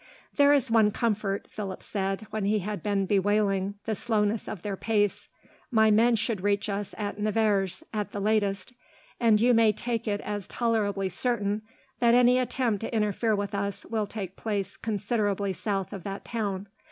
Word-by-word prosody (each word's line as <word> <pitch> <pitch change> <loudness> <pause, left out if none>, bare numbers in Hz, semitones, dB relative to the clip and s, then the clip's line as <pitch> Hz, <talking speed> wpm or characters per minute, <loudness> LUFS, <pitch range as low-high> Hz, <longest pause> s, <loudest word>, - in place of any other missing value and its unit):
"There 285 -1 +6
is 270 -4 +3
one 220 -2 +5
comfort," 210 -2 -1
Philip 195 -3 -6
said, 195 -1 -2
when 215 -1 -2
he 210 +2 +2
had 205 +1 -4
been 200 -2 0
bewailing 200 0 +1
the 220 - 0
slowness 215 -1 0
of 195 -5 -6
their 205 -2 -2
pace, 205 0 0 0.4
"my 220 -3 +4
men 230 +3 +5
should 220 -3 -1
reach 205 +1 0
us 200 0 -3
at 205 -1 -4
Nevers, 210 - +1
at 210 -1 -2
the 205 - -4
latest, 205 +1 0 0.5
and 225 -3 +4
you 245 +3 +4
may 225 -2 +5
take 230 +2 -3
it 205 -1 0
as 205 -2 -4
tolerably 210 -5 0
certain 210 +1 0 0.4
that 235 -1 +5
any 250 +1 +5
attempt 245 -4 0
to 225 - -4
interfere 215 0 +1
with 200 0 -3
us 200 -1 -3
will 220 -2 -2
take 195 -3 -6
place 205 -3 -3
considerably 205 -2 -1
south 195 +2 -2
of 195 - -6
that 195 +2 -6
town. 205 -4 -3
210 Hz, 175 wpm, -27 LUFS, 200-225 Hz, 0.5 s, There